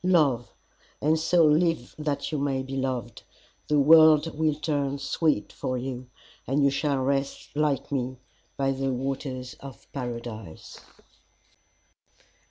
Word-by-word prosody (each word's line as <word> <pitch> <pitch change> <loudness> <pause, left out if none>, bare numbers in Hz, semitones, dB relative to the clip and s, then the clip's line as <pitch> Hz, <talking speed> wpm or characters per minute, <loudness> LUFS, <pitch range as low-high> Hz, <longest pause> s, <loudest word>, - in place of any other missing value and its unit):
Love, 150 -10 +2 0.5
and 155 +2 +2
so 165 +1 +4
live 155 -3 +2
that 145 -1 -2
you 150 - -1
may 135 -2 -1
be 135 +1 -6
loved 130 -4 -3 0.5
the 150 - +2
world 155 +1 +6
will 155 -1 +1
turn 145 -2 -1
sweet 140 -3 0
for 130 - -3
you, 125 0 -5 0.4
and 140 +3 +2
you 140 - +4
shall 140 0 0
rest 135 +2 -2
like 145 -3 0
me 130 -1 -2 0.4
by 135 0 +1
the 135 0 -1
Waters 130 -1 -4
of 140 -3 -11
Paradise. 115 - -7
140 Hz, 130 wpm, -26 LUFS, 130-150 Hz, 0.5 s, world